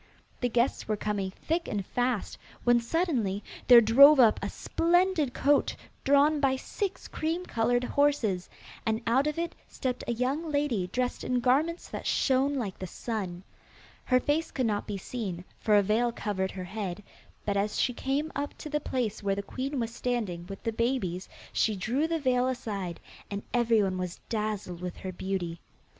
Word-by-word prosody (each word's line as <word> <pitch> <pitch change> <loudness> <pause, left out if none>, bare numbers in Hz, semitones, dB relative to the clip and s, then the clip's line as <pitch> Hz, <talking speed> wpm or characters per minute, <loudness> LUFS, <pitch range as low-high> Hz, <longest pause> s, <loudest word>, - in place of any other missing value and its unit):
The 245 - 0
guests 240 +2 +1
were 215 -1 0
coming 205 -2 -2
thick 325 - -2
and 200 -3 -2
fast, 245 -2 -1 0.2
when 240 0 +5
suddenly 235 - 0 0.2
there 245 -2 +10
drove 275 +6 +8
up 230 -4 +6
a - - -2
splendid 345 -4 +1
coach 280 +2 +2 0.3
drawn 285 +2 +4
by 270 -2 +3
six 390 +8 -4
cream 330 +3 -2
coloured 245 -1 +1
horses, 250 -10 +1 0.3
and 220 +1 -1
out 260 +5 +3
of 300 - -2
it 335 0 -2
stepped 255 -1 -3
a 240 - +1
young 275 +7 -1
lady 280 -11 0
dressed 250 +6 -2
in 250 -1 +1
garments 285 +8 +1
that - - -5
shone 270 +1 +2
like 215 -8 -3
the 185 - -4
sun. 190 -3 -4 0.6
Her 255 -1 +4
face 295 +5 0
could 260 - -1
not 210 -2 -1
be 205 -2 -3
seen, 190 -4 -5
for 215 -2 +3
a 205 - +6
veil 225 +4 +2
covered 200 -4 -2
her 190 -1 -6
head, 195 0 -5 0.4
but 205 - 0
as 205 +1 0
she 250 - +2
came 280 +6 -1
up 285 +1 -3
to 305 - -8
the 300 - +1
place 235 -6 -2
where 200 -1 0
the 200 - -3
queen 270 +5 -3
was 230 -1 -2
standing 215 -10 -2
with 195 0 -8
the 225 - -1
babies 220 -7 -1 0.2
she 215 - +2
drew 245 +11 0
the 330 0 0
veil 255 -4 +2
aside, 205 -9 -3 0.3
and 200 0 -4
everyone 220 -6 +2
was 180 -1 -4
dazzled 210 -5 -3
with 180 -1 -5
her 185 - -5
beauty. 180 -2 -3
235 Hz, 180 wpm, -29 LUFS, 200-275 Hz, 0.6 s, there